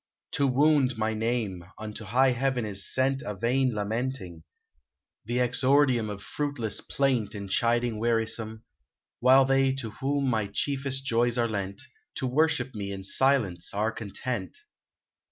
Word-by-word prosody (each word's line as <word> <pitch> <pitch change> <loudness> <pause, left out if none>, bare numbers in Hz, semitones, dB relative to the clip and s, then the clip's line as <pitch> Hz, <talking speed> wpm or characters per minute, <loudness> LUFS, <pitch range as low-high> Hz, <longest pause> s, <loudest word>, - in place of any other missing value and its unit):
To 140 - +2
wound 135 -2 +3
my 110 0 0
name, 110 -5 -2
unto 110 0 -7
high 130 +6 +3
heaven 125 -1 0
is 100 -2 -2
sent 135 +1 +1
A 105 - -5
vain 125 +5 +1
lamenting, 105 -4 -3 0.4
— 65 - -59
the 120 +3 -2
exordium 125 -1 +3
Of 100 -1 -7
fruitless 140 -7 -2
plaint 130 -7 0
and 100 -1 -6
chiding 120 0 +1
wearisome, 115 -1 0 0.3
— - - -65
While 130 +2 +6
they 135 0 +3
to 120 -5 -5
whom 140 +4 -1
my 110 -5 0
chief 140 +5 -2
est 135 0 -1
joys 120 -1 +2
are 120 -1 +2
lent. 100 -2 -4 0.3
To - - -2
worship 135 0 +1
me 100 -2 -5
in 95 -1 -6
silence 115 -5 +1
are 110 +2 +1
content 110 -1 -5
120 Hz, 155 wpm, -27 LUFS, 105-135 Hz, 0.4 s, While